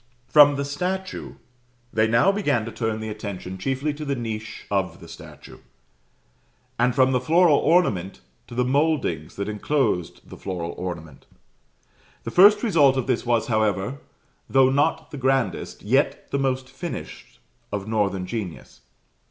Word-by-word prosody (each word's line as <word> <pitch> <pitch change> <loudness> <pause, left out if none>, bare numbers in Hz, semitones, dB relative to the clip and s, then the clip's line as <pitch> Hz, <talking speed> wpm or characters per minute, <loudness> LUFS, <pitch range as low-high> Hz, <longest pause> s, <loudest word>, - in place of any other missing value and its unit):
From 145 +1 +7
the 140 0 -2
statue 185 +6 -4 0.6
they 110 0 +3
now 120 +12 +4
began 145 - 0
to 115 - -6
turn 110 0 -3
the 110 - -4
attention 100 -3 -6
chiefly 135 +7 -1
to 150 +1 -7
the 140 -2 -1
niche 110 -3 -6
of 95 -3 -1
the - - -12
statue, - - -12 1.2
and 125 0 +2
from 130 -1 +4
the 125 -1 +1
floral 165 +2 +4
ornament 100 - +1 0.3
to 120 - -10
the 125 0 +1
mouldings 130 - 0
that 100 0 -4
enclosed 105 - -1
the - - -11
floral 85 -3 -4
ornament. 85 -6 -7 1.0
The - - -5
first 205 +4 +6
result 150 - +4
of 130 - -1
this 125 -2 -1
was, 120 -2 +2
however, 110 +3 0 0.5
though 135 -1 +4
not 145 +4 0
the 145 - -7
grandest, 135 -1 -1
yet 135 +7 0
the 140 - 0
most 130 -1 -1
finished 155 +5 -8 0.3
of 105 0 -4
northern 100 -4 0
genius. 100 -5 -7
125 Hz, 150 wpm, -24 LUFS, 105-145 Hz, 1.2 s, From